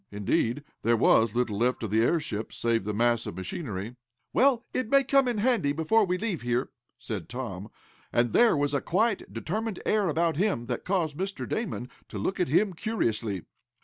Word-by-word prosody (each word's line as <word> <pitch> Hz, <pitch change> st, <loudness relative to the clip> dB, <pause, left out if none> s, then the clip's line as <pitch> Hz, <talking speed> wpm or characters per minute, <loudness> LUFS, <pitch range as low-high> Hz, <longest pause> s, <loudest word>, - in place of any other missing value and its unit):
Indeed, 110 Hz, +6 st, 0 dB, 0.2 s
there 115 Hz, +1 st, +3 dB
was 110 Hz, 0 st, +4 dB
little 120 Hz, -4 st, 0 dB
left 125 Hz, 0 st, +1 dB
of 110 Hz, -, -3 dB
the 110 Hz, +1 st, +3 dB
airship, 115 Hz, -6 st, 0 dB
save 115 Hz, -4 st, 0 dB
the 105 Hz, -, -1 dB
mass 120 Hz, +1 st, +2 dB
of -, -, -5 dB
machinery. 105 Hz, -, -5 dB, 0.4 s
"Well, 255 Hz, -2 st, +3 dB
it 255 Hz, -4 st, -1 dB
may 275 Hz, +1 st, +5 dB
come 275 Hz, 0 st, +3 dB
in 240 Hz, -3 st, 0 dB
handy 210 Hz, -, +2 dB
before 165 Hz, +8 st, +3 dB
we 180 Hz, 0 st, 0 dB
leave 195 Hz, -5 st, -2 dB
here," 120 Hz, +1 st, -1 dB, 0.3 s
said 110 Hz, -9 st, -6 dB
Tom, 110 Hz, -5 st, -5 dB, 0.4 s
and 120 Hz, 0 st, +1 dB
there 235 Hz, -9 st, +5 dB
was 145 Hz, 0 st, 0 dB
a 140 Hz, -, +1 dB
quiet 205 Hz, -, 0 dB
determined 190 Hz, -, -3 dB
air 210 Hz, -4 st, +2 dB
about 165 Hz, 0 st, +1 dB
him, 185 Hz, -, 0 dB
that 120 Hz, 0 st, -4 dB
caused 175 Hz, -6 st, 0 dB
Mr. 195 Hz, +2 st, -3 dB
Damon 190 Hz, -, -3 dB, 0.2 s
to 105 Hz, -, -6 dB
look 105 Hz, -, -2 dB
at 180 Hz, -, +2 dB
him 190 Hz, +7 st, +2 dB
curiously. 115 Hz, -, -2 dB
145 Hz, 185 wpm, -28 LUFS, -, 0.4 s, may